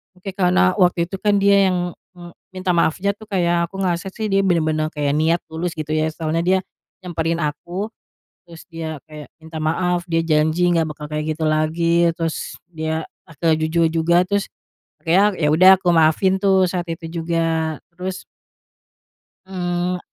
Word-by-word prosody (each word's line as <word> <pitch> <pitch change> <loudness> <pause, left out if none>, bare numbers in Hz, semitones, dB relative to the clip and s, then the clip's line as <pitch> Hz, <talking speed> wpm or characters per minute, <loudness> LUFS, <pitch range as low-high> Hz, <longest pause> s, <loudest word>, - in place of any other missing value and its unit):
Oke, 185 +2 -8
karena 185 0 +2
waktu 175 -2 +2
itu 195 - -5
kan 205 0 +1
dia 200 0 +5
yang, - - 0 0.4
eee, 175 -1 -11 0.2
minta 185 0 -4
maafnya 180 +4 +1
tuh 215 - -12
kayak 175 -4 +1
aku 195 +3 -7
ngerasa 185 +1 -2
sih 220 -1 -3
dia 195 0 +2
benar-benar 155 -3 +1
kayak 145 -1 -1
niat 165 +2 +2
tulus 165 +2 -3
gitu 155 -1 -6
ya, 155 0 +1
soalnya 165 +1 -2
dia 190 +1 +3 0.4
nyamperin 170 -2 -2
aku, 170 +7 -3 0.6
terus 170 -2 -13
dia 160 -3 -6
kayak 150 -1 -9 0.2
minta 160 0 -9
maaf, 175 +3 0
dia 165 -1 0
janji 160 +2 +2
enggak 165 -2 +2
bakal 150 - -9
kayak 150 +1 -2
gitu 160 +1 -5
lagi, 165 +2 +2
terus, 165 -1 -4
dia 160 -1 -3 0.2
akhirnya 165 +1 0
jujur 165 +1 +2
juga, 165 +2 +3
terus, 200 +2 0 0.6
akhirnya, 180 +4 +4 0.2
ya 150 - +3
udah 185 +4 +7
aku 180 - -4
maafin 165 +4 +3
tuh, 190 -1 +3
saat 175 -1 -3
itu 165 0 -6 0.2
juga. 165 -1 -1 0.2
Terus 185 +1 -5 1.2
eee, 180 -1 -2
170 Hz, 165 wpm, -20 LUFS, 160-185 Hz, 1.2 s, udah